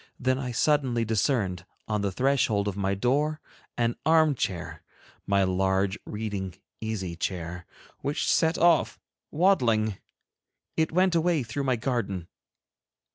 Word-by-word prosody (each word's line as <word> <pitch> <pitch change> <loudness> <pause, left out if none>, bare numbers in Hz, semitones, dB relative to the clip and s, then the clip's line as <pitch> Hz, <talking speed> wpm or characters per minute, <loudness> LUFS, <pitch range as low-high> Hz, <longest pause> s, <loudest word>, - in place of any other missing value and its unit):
Then 130 +1 +1
I 125 -2 -3
suddenly 125 -2 +2
discerned, 105 - 0 0.2
on 105 -1 0
the 100 -1 -1
threshold 115 -4 +1
of 100 - -2
my 100 0 0
door, 145 +8 +1 0.4
an 120 0 +1
armchair, 155 - +1 0.5
my 100 -1 +3
large 95 +1 +1
reading 100 -4 -4 0.2
easy 100 -6 -4
chair, 85 0 -4 0.3
which 145 +3 -2
set 160 +1 +3
off 170 -1 +3 0.3
waddling. 115 - +2 0.8
It 160 -1 +1
went 185 +2 +3
away 165 -3 +2
through 120 +5 -4
my 130 -2 +2
garden. 115 -8 -2
115 Hz, 125 wpm, -27 LUFS, 100-145 Hz, 0.8 s, my